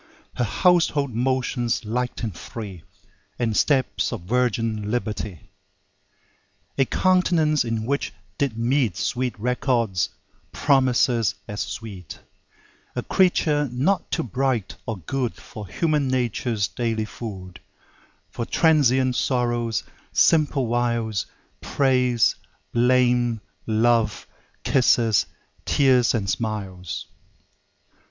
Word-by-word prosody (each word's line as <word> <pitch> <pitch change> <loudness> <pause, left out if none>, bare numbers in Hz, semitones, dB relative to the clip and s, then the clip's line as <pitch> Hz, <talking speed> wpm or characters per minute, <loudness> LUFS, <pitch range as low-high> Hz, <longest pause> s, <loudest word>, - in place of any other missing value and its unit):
Her 125 - -1
household 150 - +2
motions 120 -1 0
light 125 +3 -2
and 110 -6 -3
free, 100 -3 -8 0.6
And 115 -3 -1
steps 135 +1 +1
of - - -4
virgin 115 0 0
liberty; 105 - -4 1.2
A 135 - +3
countenance 170 -3 +2
in 115 -2 -2
which 140 -3 -1 0.3
did 135 -6 0
meet 120 - +1
Sweet 125 -2 -2
records, 120 -5 0 0.4
promises 125 -5 +2
as 105 +1 -4
sweet; 95 -7 -7 0.8
A - - -2
Creature 150 -6 +2
not 145 +11 0
too 165 - -1
bright 125 -4 -1
or 110 -3 -3
good 120 - -3
For 105 -2 -10
human 150 - 0
nature's 120 -4 0
daily 115 -2 -2
food; 95 -6 -8 0.7
For 120 - -4
transient 130 -6 +3
sorrows, 120 -3 0 0.3
simple 150 -4 +3
wiles, 115 -4 -1 0.3
Praise, 125 -4 +2 0.4
blame, 120 -1 +3 0.3
love, 115 0 +2 0.4
kisses, 120 -5 +3 0.4
tears 130 -4 +3
and 105 -4 -1
smiles. 95 -8 -3
120 Hz, 100 wpm, -23 LUFS, 110-130 Hz, 1.2 s, A